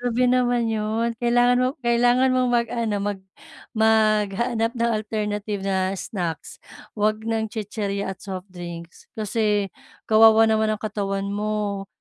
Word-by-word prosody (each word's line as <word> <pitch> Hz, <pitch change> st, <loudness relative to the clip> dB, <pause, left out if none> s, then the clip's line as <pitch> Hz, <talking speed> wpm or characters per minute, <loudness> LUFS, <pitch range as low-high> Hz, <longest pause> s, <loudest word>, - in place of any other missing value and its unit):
Grabe 245 Hz, 0 st, +1 dB
naman 245 Hz, -1 st, +2 dB
'yun. 225 Hz, +1 st, -1 dB
Kailangan 245 Hz, +1 st, +4 dB
mo -, -, +3 dB
kailangan 245 Hz, +1 st, +3 dB
mong 255 Hz, -1 st, +2 dB
mag-ano, 235 Hz, -2 st, 0 dB
mag 205 Hz, 0 st, -2 dB, 0.6 s
maghanap 220 Hz, +1 st, +2 dB
ng 235 Hz, 0 st, 0 dB
alternative 210 Hz, -2 st, -3 dB
na 190 Hz, -1 st, 0 dB
snacks. 180 Hz, -4 st, -5 dB, 0.4 s
Huwag 215 Hz, +1 st, +1 dB
ng 225 Hz, -1 st, -1 dB
chichirya 205 Hz, -2 st, -4 dB
at 190 Hz, -, -8 dB
softdrinks. 175 Hz, -3 st, -9 dB
Kasi 210 Hz, -2 st, 0 dB, 0.4 s
kawawa 220 Hz, 0 st, +6 dB
naman 220 Hz, 0 st, +2 dB
ang 210 Hz, -, -10 dB
katawan 200 Hz, -2 st, -2 dB
mo. 205 Hz, -1 st, -2 dB
215 Hz, 125 wpm, -23 LUFS, 200-235 Hz, 0.6 s, kawawa